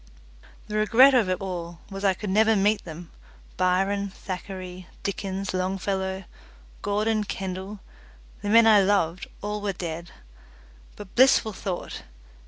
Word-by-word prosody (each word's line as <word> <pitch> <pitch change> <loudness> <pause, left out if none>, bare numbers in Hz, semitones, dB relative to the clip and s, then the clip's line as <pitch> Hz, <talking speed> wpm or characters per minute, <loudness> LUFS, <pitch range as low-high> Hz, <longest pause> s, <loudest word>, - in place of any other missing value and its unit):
The 210 0 -3
regret 240 +6 +6
of 230 -7 +3
it 185 0 0
all 175 -3 -5
was 195 0 -6
I 195 -2 +3
could 205 0 -4
never 220 +2 +4
meet 205 +2 +2
them 165 0 -9 0.4
Byron, 195 +2 +1
Thackeray, 185 -1 -7 0.2
Dickens, 195 0 -3
Longfellow, 190 +1 -2 0.6
Gordon, 215 +1 0
Kendall, 190 0 -5 0.6
the 205 - -3
men 230 +2 +7
I 215 -2 +7
loved, 190 -3 +1 0.2
all 210 0 -3
were 200 -1 -1
dead; 170 -1 -5 0.9
but, 205 -2 -11
blissful 255 -4 +5
thought! 185 -1 -5
195 Hz, 130 wpm, -25 LUFS, 185-210 Hz, 0.9 s, men